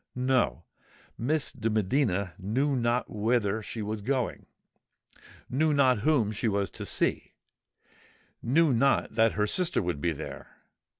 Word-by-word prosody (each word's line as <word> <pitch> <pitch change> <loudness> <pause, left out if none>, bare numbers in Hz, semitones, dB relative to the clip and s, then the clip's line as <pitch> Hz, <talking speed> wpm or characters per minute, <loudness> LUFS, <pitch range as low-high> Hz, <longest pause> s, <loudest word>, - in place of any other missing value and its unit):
No:—Miss 125 - -2
de 115 -3 -2
Medina 100 - 0
knew 130 +9 0
not 120 0 0
whither 110 -1 0
she 110 +1 -6
was 105 0 -4
going—knew 135 +3 -4
not 130 -5 +4
whom 120 -4 +2
she 110 +2 -2
was 100 -2 0
to - - -7
see—knew 145 +4 -3
not 135 +1 +2
that 115 0 +3
her 105 - +1
sister 175 - 0
would 85 -5 -3
be 85 - +1
there! 70 -2 -8
115 Hz, 120 wpm, -28 LUFS, 100-135 Hz, -, not